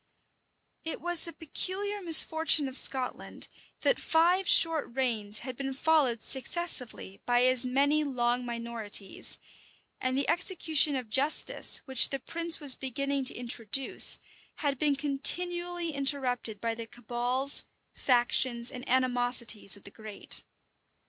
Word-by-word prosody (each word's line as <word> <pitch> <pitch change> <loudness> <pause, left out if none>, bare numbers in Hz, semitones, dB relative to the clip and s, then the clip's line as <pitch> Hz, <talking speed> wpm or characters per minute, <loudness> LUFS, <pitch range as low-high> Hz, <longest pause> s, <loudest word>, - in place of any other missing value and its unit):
It 325 - -6
was 350 0 -1
the 335 - -8
peculiar 400 +6 -5
misfortune 320 -3 +3
of 260 - -10
Scotland, 260 -2 +1 0.3
that - - +1
five 350 +3 0
short 325 -3 +3
reigns 220 -5 -2
had 255 -1 -8
been 270 +1 -7
followed 275 -6 -1
successively 260 - 0
by 245 0 +1
as 255 0 +1
many 285 +4 0
long 250 -3 -3
minorities; 230 -4 -3 0.6
and 255 0 -3
the 280 - -2
execution 320 -5 0
of 255 -3 -6
justice, 280 +6 +2
which 265 -3 +6
the 275 - -4
prince 335 +5 +1
was 285 -4 +3
beginning 275 +1 -4
to - - -3
introduce, 240 +1 +3 0.4
had 280 -4 -4
been 295 -2 0
continually 345 +5 0
interrupted 265 -6 +1
by 230 +1 -4
the 225 0 -9
cabals, 245 +4 +1 0.3
factions, 240 -1 0
and 250 0 -11
animosities 245 -5 0
of 200 - -21
the 200 - -13
great. 215 -2 -2
265 Hz, 130 wpm, -27 LUFS, 240-310 Hz, 0.6 s, which